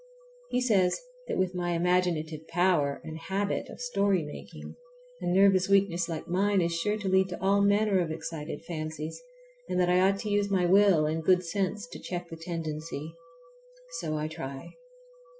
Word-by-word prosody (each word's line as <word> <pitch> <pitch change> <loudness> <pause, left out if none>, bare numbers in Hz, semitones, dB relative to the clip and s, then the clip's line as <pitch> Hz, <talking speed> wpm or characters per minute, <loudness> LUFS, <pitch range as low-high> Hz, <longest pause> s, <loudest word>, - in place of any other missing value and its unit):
He 250 - 0
says 195 -7 +2 0.3
that - - -2
with 185 -1 +1
my 175 -1 -1
imaginative 170 -3 0
power 170 -5 +1
and 160 0 -7
habit 195 +4 -2
of - - -10
story 200 -7 +1
making 150 - -9 0.5
a - - -3
nervous 190 +1 +4
weakness 185 -4 +2
like 160 -2 -5
mine 195 +3 +2
is 170 -1 +1
sure 210 +6 0
to 205 -2 -4
lead 190 0 +3
to - - -6
all 200 +1 +3
manner 200 -1 +3
of 170 -2 0
excited 160 0 -6
fancies, 155 - -5 0.5
and - - 0
that 180 -1 +3
I 180 - +4
ought 195 +1 +3
to 215 - -4
use 205 0 +1
my 190 -2 +2
will 190 -3 +5
and 160 +1 -1
good 180 +2 +3
sense 195 +4 -2
to - - -9
check 175 -1 -5
the 165 - -7
tendency. 160 -2 -5 0.9
So 155 0 -2
I 150 0 -2
try. 135 -3 -7
180 Hz, 175 wpm, -28 LUFS, 160-195 Hz, 0.9 s, will